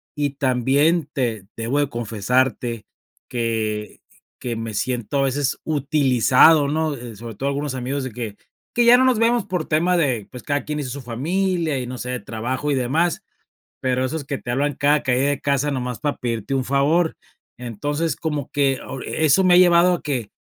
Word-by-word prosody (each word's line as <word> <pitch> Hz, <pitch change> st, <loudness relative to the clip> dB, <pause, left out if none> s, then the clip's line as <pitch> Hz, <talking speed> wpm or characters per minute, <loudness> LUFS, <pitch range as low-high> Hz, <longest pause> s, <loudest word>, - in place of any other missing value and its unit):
y 145 Hz, -1 st, 0 dB
también 140 Hz, +4 st, +2 dB
te 115 Hz, -7 st, -2 dB
debo 120 Hz, +6 st, -1 dB
de 145 Hz, -1 st, +1 dB
confesarte 120 Hz, +1 st, -1 dB, 0.4 s
que 110 Hz, -3 st, -2 dB, 0.4 s
que 120 Hz, -2 st, -3 dB
me 115 Hz, -1 st, -5 dB
siento, 125 Hz, +3 st, -2 dB
a -, -, +3 dB
veces, 135 Hz, +1 st, 0 dB
utilizado, 140 Hz, 0 st, +4 dB
¿no? 155 Hz, -1 st, 0 dB
Eh, 120 Hz, -4 st, -9 dB
sobre 115 Hz, -1 st, -8 dB
todo, 140 Hz, +5 st, -2 dB
algunos 140 Hz, -1 st, -3 dB
amigos 130 Hz, +2 st, -3 dB
de 125 Hz, -, -6 dB
que 110 Hz, -4 st, -6 dB, 0.3 s
que 240 Hz, -1 st, +2 dB
ya 245 Hz, +1 st, +8 dB
no 260 Hz, -, +4 dB
nos 255 Hz, -3 st, +3 dB
vemos 230 Hz, -2 st, +2 dB
por 180 Hz, -5 st, -2 dB
tema 175 Hz, +3 st, +2 dB
de, 125 Hz, -10 st, 0 dB
pues, 125 Hz, -, -10 dB
cada 145 Hz, -2 st, -1 dB
quien 150 Hz, 0 st, -4 dB
hizo 130 Hz, -4 st, -4 dB
su 140 Hz, +1 st, -6 dB
familia 160 Hz, +4 st, -1 dB
y 125 Hz, -, -5 dB
no 125 Hz, 0 st, -6 dB
sé, 125 Hz, +1 st, -5 dB
de 125 Hz, -, -3 dB
trabajo 125 Hz, +6 st, -3 dB
y -, -, +2 dB
demás, 145 Hz, +8 st, 0 dB, 0.6 s
pero 130 Hz, 0 st, 0 dB
esos 150 Hz, +3 st, -3 dB
que 140 Hz, 0 st, -4 dB
te 120 Hz, -, -9 dB
hablan 140 Hz, +3 st, 0 dB
cada 145 Hz, +1 st, +2 dB
caída 130 Hz, +2 st, +1 dB
de 145 Hz, -1 st, -1 dB
casa 140 Hz, +1 st, +1 dB
nomás 125 Hz, -2 st, -3 dB
para 145 Hz, -1 st, -1 dB
pedirte 120 Hz, +2 st, -3 dB
un 130 Hz, -, 0 dB
favor. 145 Hz, +6 st, +2 dB, 0.4 s
Entonces, 145 Hz, +7 st, -2 dB
como 150 Hz, -4 st, -3 dB
que 135 Hz, -3 st, +1 dB
o 135 Hz, -, -6 dB
e 160 Hz, -, -1 dB
eso 160 Hz, +6 st, +4 dB
me 180 Hz, -1 st, +5 dB
ha -, -, +7 dB
llevado 175 Hz, 0 st, +6 dB
a 175 Hz, -, -3 dB
que, 130 Hz, -8 st, -3 dB
135 Hz, 195 wpm, -22 LUFS, 125-150 Hz, 0.6 s, ya